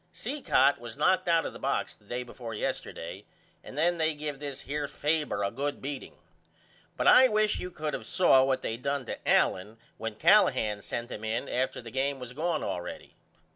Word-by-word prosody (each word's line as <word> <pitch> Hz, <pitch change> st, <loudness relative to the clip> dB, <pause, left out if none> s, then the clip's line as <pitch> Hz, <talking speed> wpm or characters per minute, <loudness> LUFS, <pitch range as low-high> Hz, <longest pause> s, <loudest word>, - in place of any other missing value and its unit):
Cicotte 280 Hz, -, +2 dB
was 120 Hz, -2 st, -8 dB
knocked 185 Hz, 0 st, +2 dB
out 165 Hz, -1 st, +3 dB
of -, -, -4 dB
the -, -, -10 dB
box -, -, -1 dB
the 105 Hz, -, -23 dB
day 125 Hz, +4 st, -3 dB
before 120 Hz, -2 st, -8 dB
yesterday -, -, -4 dB, 0.4 s
and 135 Hz, -, -10 dB
then 170 Hz, +2 st, +2 dB
they 160 Hz, -1 st, +1 dB
give 150 Hz, -2 st, -5 dB
this 140 Hz, -2 st, -5 dB
here 145 Hz, +1 st, -3 dB
Faber 150 Hz, -8 st, -1 dB
a 100 Hz, -, 0 dB
good 145 Hz, +1 st, -3 dB
beating 140 Hz, 0 st, -6 dB, 0.8 s
but -, -, -1 dB
I 260 Hz, +1 st, +8 dB
wish 215 Hz, -2 st, +2 dB
you 180 Hz, -, -4 dB
could 155 Hz, -3 st, -4 dB
of -, -, -5 dB
saw 135 Hz, -8 st, +5 dB
what 130 Hz, -1 st, 0 dB
they 115 Hz, -, -2 dB
done 140 Hz, +1 st, -2 dB
to -, -, -5 dB
Allen 105 Hz, +5 st, +2 dB, 0.2 s
when 115 Hz, -1 st, -4 dB
Callahan 130 Hz, -, +4 dB
sent 120 Hz, +4 st, -5 dB
him 105 Hz, -, -6 dB
in 110 Hz, +2 st, -2 dB
after 130 Hz, 0 st, -1 dB
the 115 Hz, -, -9 dB
game 135 Hz, +2 st, 0 dB
was 125 Hz, -1 st, -8 dB
gone 160 Hz, +2 st, -1 dB
allready. 90 Hz, 0 st, -5 dB
140 Hz, 195 wpm, -29 LUFS, 120-160 Hz, 0.8 s, I